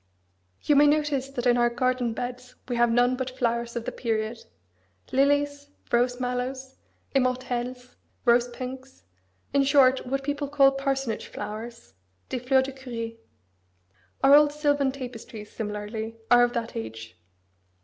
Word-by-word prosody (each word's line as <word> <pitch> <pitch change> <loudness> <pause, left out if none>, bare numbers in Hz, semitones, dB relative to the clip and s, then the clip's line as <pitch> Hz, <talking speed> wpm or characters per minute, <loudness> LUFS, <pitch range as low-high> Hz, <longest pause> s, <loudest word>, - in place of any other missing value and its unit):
You 295 - +3
may 290 +1 +7
notice 290 -3 +1
that 255 -3 -4
in 245 -1 +4
our 240 0 +4
garden 245 -1 0
beds 245 +1 -6
we 245 - -2
have 240 0 +3
none 245 +2 +3
but 260 0 -3
flowers 235 -2 -2
of 235 -1 -3
the - - -3
period 225 -1 -3 0.7
lilies, 285 +1 +1 0.2
rose 245 +1 +2
mallows, 255 +1 -3 0.4
immortelles, 250 -1 -2 0.3
rose 240 0 +4
pinks, 260 +2 -8 0.5
in 280 - +4
short 270 -1 +4
what 275 +1 -1
people 285 +1 -2
call 275 -1 +5
parsonage 270 -4 -2
flowers 225 +3 -7 0.4
des 255 - -2
fleurs 260 +2 +3
de 270 - -5
curé. 235 -4 -6 1.1
Our 275 - +7
old 295 0 +7
silvan 290 -2 +1
tapestries, 240 -5 -8
similarly, 220 +1 -5 0.2
are 245 0 +8
of 245 0 +1
that 235 -2 -3
age. 110 -1 -7
250 Hz, 140 wpm, -26 LUFS, 235-270 Hz, 1.1 s, are